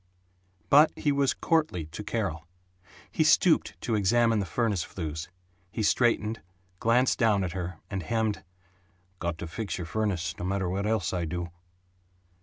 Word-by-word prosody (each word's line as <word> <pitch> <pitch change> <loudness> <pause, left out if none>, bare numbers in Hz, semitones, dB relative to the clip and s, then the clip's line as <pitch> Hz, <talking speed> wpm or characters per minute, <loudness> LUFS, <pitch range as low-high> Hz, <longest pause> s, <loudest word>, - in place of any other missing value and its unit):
But 150 +3 +7
he 145 - 0
was 140 -1 +2
courtly 155 - 0
to 80 +7 -8
Carol. 95 -8 -3 0.6
He - - +2
stooped - - +3
to 115 - -2
examine 115 +2 +3
the 100 - -2
furnace 105 +1 0
flues; 80 -2 -5 0.4
he 110 - -2
straightened, 115 -1 +2 0.4
glanced 125 +3 +3
down 105 -4 +3
at 90 - -2
her, 90 -1 -5
and 95 +1 -3
hemmed, 110 +3 -1 0.8
"Got 85 -2 -2
to 85 - -6
fix 105 +5 -4
your 90 - -4
furnace, 95 -2 -1
no - - -4
matter 95 0 -1
what 100 +3 -1
else 110 -2 0
I 90 -2 -1
do." 85 +1 -4
100 Hz, 155 wpm, -28 LUFS, 85-115 Hz, 0.8 s, But